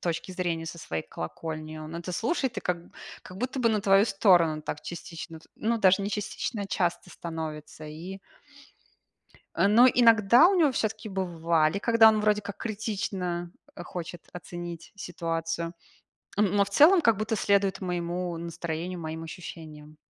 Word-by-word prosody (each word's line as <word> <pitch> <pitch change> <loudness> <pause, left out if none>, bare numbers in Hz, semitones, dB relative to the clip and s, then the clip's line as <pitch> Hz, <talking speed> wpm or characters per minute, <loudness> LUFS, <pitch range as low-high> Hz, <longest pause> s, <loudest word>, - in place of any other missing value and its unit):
точки 170 +1 -3
зрения, 170 -3 -2
со 170 - -7
своей 80 - -4
колокольни, 155 - -6
он 155 +2 -7
это 175 +2 -5
слушает 235 - -1
и - - -2
как 180 -1 -1 0.4
как 185 - -11
будто 255 +5 -3
бы 240 -2 +3
на 215 -2 +1
твою 195 0 +5
сторону 175 -7 +3
так 150 - -5
частично, 165 -1 -8
т - - -22
ну, 230 +1 0
даже 190 -2 +5
не 200 - -1
частично, 210 +1 -3
а - - -4
часто 180 -2 -1
становится, 155 -2 -7
и 170 +6 -8 1.4
Э, - - +3
но 230 +5 +7
иногда 235 - +6
у 395 - +2
него 315 -6 +4
всё-таки 220 -2 -2
бывали, 170 -2 0
когда 230 +1 +6
он 215 -1 +2
вроде 210 0 +2
как 200 -1 -7
критично 190 -5 -3 0.2
хочет 175 -1 -7
оценить 175 -1 -8
ситуацию, 165 -2 -3 0.6
но 205 0 +3
в 200 - -10
целом 325 - +7
как 230 -2 +4
будто 220 +1 -1
следует 200 -1 +2
моему 175 -1 -3
настроению, 170 +1 -4
моим 160 0 -5
ощущениям. 155 -3 -10
180 Hz, 155 wpm, -27 LUFS, 165-210 Hz, 1.4 s, но